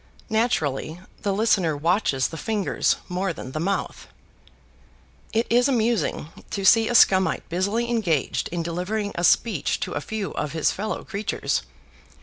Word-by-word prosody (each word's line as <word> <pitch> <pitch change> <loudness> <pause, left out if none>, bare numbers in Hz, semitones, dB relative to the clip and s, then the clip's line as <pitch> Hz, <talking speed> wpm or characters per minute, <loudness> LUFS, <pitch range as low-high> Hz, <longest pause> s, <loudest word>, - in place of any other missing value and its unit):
Naturally, 170 - 0 0.2
the 200 - 0
listener 195 -7 +2
watches 160 -4 +1
the - - -8
fingers 210 +3 0
more 180 0 -2
than 130 - -8
the 155 - -4
mouth. 195 +4 -2 1.2
It 225 +2 +1
is 245 +2 +3
amusing 225 - 0 0.2
to 195 -1 -3
see 225 +3 +6
a 240 - 0
Scumite 190 -4 +4
busily 200 +7 0
engaged 195 - 0
in 170 0 -3
delivering 185 +5 -2
a 170 - -3
speech 180 -1 +2
to - - -3
a 145 - -2
few 215 +3 -4
of 150 -1 -4
his 160 -2 +2
fellow 215 +2 -4
creatures. 200 +1 -2
195 Hz, 145 wpm, -24 LUFS, 165-220 Hz, 1.2 s, see